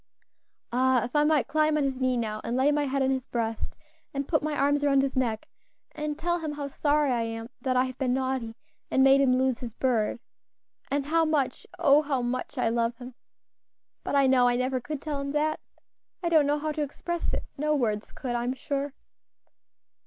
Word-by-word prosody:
Ah! 255 0 +3
if 245 +4 -6
I 295 - +5
might 300 -2 +2
climb 310 +1 +2
on 295 - +1
his 265 -1 -2
knee 255 -1 +2
now, 215 -2 -2
and 235 +2 -2
lay 270 +3 +4
my 295 0 +1
head 275 0 0
on 265 - +2
his 260 -1 -2
breast, 225 -2 -3 0.4
and 275 0 -2
put 310 - +2
my 305 0 -2
arms 285 +1 +2
round 275 -1 +4
his 275 0 -2
neck, 235 -4 -1 0.4
and 300 -1 -4
tell 345 +2 0
him 310 -2 -4
how 290 -1 -4
sorry 290 0 +1
I 240 -2 +1
am 225 0 -4
that 255 0 0
I 255 - +5
have 255 -1 -6
been 255 -2 +1
naughty, 260 -4 -2 0.3
and 265 - +3
made 270 +1 +6
him 255 -2 +4
lose 260 -1 +1
his 235 -3 -7
bird; 240 -3 0 0.7
and 280 0 0
how 325 +3 +2
much 295 -5 0
oh! 300 -4 +5
how 275 -4 -1
much 250 +1 -3
I - - +1
love 230 +1 0
him! 250 +1 -9 0.9
But - - -2
I 280 -1 +5
know 260 -2 +5
I 245 - +3
never 255 +1 0
could 290 +3 -6
tell 295 -2 -3
him 280 0 -4
that 305 +1 +1 0.6
I 340 - +1
don't 310 -4 +4
know 290 +1 +2
how 305 +1 -2
to 300 0 -3
express 335 +4 -3
it; - - -3
no 300 +1 +1
words 215 -6 -1
could, 250 -3 -4
I 240 0 -1
am 245 +1 -1
sure. 280 +1 -3
270 Hz, 215 wpm, -27 LUFS, 250-295 Hz, 0.9 s, made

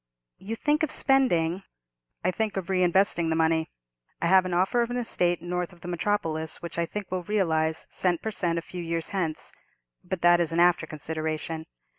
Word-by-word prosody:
"You 210 +4 -5
think 295 +6 +1
of 315 - +1
spending——" 195 - +2 0.6
"I 185 - +2
think 215 +1 -2
of 190 -2 -4
reinvesting 185 -2 +3
the 160 - +1
money. 160 0 +1 0.5
I - - -1
have 185 +1 +5
an 180 - -3
offer 190 +7 +2
of 235 - -1
an 245 - -2
estate 175 -8 +1
north 180 0 -3
of 175 -1 -18
the - - -8
metropolis, 165 -4 -2
which 170 0 -6
I 170 - 0
think 205 0 -6
will 185 -1 -1
realize 160 -5 0
cent 175 -3 +1
per 220 - -2
cent 170 -5 0
a 165 - -3
few 180 +1 -7
years 165 -1 -2
hence: 170 -6 -3 0.5
but 180 -1 -4
that 175 0 +6
is 170 -2 +1
an 165 - 0
after 175 -2 +4
consideration. 160 +1 -4
175 Hz, 195 wpm, -26 LUFS, 165-195 Hz, 0.6 s, that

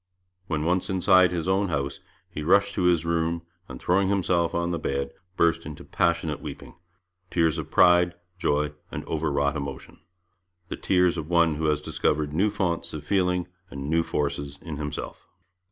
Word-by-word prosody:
When 80 -3 -1
once 90 +2 +1
inside 95 -1 +5
his 85 -1 -2
own 95 +1 +2
house, 70 -4 -2 0.3
he 75 - -7
rushed 100 +5 +3
to 90 - 0
his 85 -2 +3
room 85 0 0 0.3
and, 65 -1 -8
throwing 95 +2 +2
himself 90 -4 +1
on 85 0 0
his 85 - -3
bed, 70 -1 -2 0.3
burst 85 0 +2
into 75 -2 -8
passionate 85 -3 0
weeping - - -8 0.6
tears 80 -2 +1
of 80 - -6
pride, 90 0 +5 0.2
joy, 75 -1 0 0.2
and - - -6
overwrought 70 -2 0
emotion 70 -2 -6 0.7
the - - -3
tears 90 -2 +2
of 80 0 -6
one 85 -2 +4
who 80 - -2
has 75 -1 +2
discovered 75 0 -1
new 95 +7 +2
founts 95 -5 -1
of 75 -2 -6
feeling 90 0 +1 0.2
and 70 0 -5
new 85 0 +4
forces 70 -2 -2
in 80 -4 -6
himself. 75 -1 -6
85 Hz, 170 wpm, -26 LUFS, 75-90 Hz, 0.7 s, inside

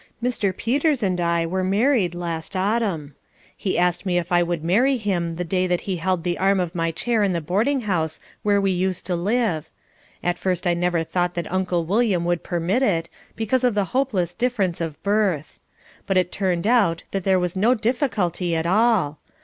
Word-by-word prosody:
Mr. 235 -6 0
Peters 280 +1 +1
and 180 -2 0
I 170 -1 +1
were 185 +3 -1
married 200 - +2
last 170 +1 -4
autumn. 190 -7 -1 0.4
He 190 - -2
asked 175 0 +1
me 180 -3 0
if 175 +1 -2
I 175 0 +4
would 170 -2 -1
marry 245 +11 +3
him 175 -6 -1
the 180 - -3
day 185 +2 0
that 180 -1 0
he 190 -3 -3
held 180 0 -1
the 175 -1 -1
arm 195 0 +3
of 175 -2 -2
my 165 -2 0
chair 220 +7 0
in 200 -2 +2
the 170 - 0
boarding 215 - 0
house 165 -7 -1 0.2
where 205 -1 +2
we 195 -1 +1
used 185 0 -1
to 180 - 0
live. 195 -3 0 0.5
At 175 0 0
first 185 -1 -1
I 175 - +3
never 175 -1 0
thought 175 +1 -1
that 170 -2 -4
Uncle 180 -3 0
William 195 -2 +1
would 175 -1 0
permit 175 +7 -1
it, 170 -10 +1 0.3
because 225 +4 0
of 245 -4 +2
the 205 -2 +2
hopeless 215 -10 0
difference 205 -6 -1
of 160 -3 -4
birth. 200 -8 0 0.5
But 195 -2 +2
it 180 -1 +1
turned 185 -3 -1
out 210 -8 +3
that 195 -2 -2
there 190 0 +3
was 180 0 -1
no 225 +7 +3
difficulty 215 - 0
at 160 0 -1
all. 190 -6 +2
185 Hz, 200 wpm, -23 LUFS, 170-210 Hz, 0.5 s, I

